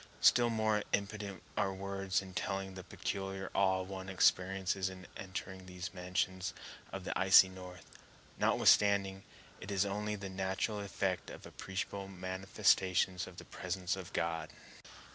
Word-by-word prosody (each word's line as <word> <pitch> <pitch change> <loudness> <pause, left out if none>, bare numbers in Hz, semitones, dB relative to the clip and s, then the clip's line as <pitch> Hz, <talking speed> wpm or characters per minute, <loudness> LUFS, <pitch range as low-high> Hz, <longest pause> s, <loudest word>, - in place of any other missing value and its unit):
Still 120 0 +6
more 110 -2 +2
impotent 100 -2 -2
are 95 - +1
words 95 -1 -1
in 95 -1 -10
telling 95 0 -2
the 95 -1 -8
peculiar 95 +1 -4
awe 95 -1 +3
one 95 0 -6
experiences 95 0 +2
in 95 -1 -10
entering 95 -1 -6
these 90 -1 -6
mansions 90 0 -2 0.4
of - - -5
the - - -3
icy 95 0 +7
North, 90 -1 -10 0.5
notwithstanding 100 -2 +4 0.4
it 95 - -8
is 100 0 +2
only 105 +1 -2
the 100 -1 -6
natural 95 +3 -1
effect 95 -2 -2
of - - -10
appreciable 95 +1 -4
manifestations 95 -1 +1
of - - -12
the - - -9
presence 90 +1 -2
of 95 -2 -8
God. 85 -1 -1
95 Hz, 140 wpm, -34 LUFS, 95-100 Hz, 0.5 s, icy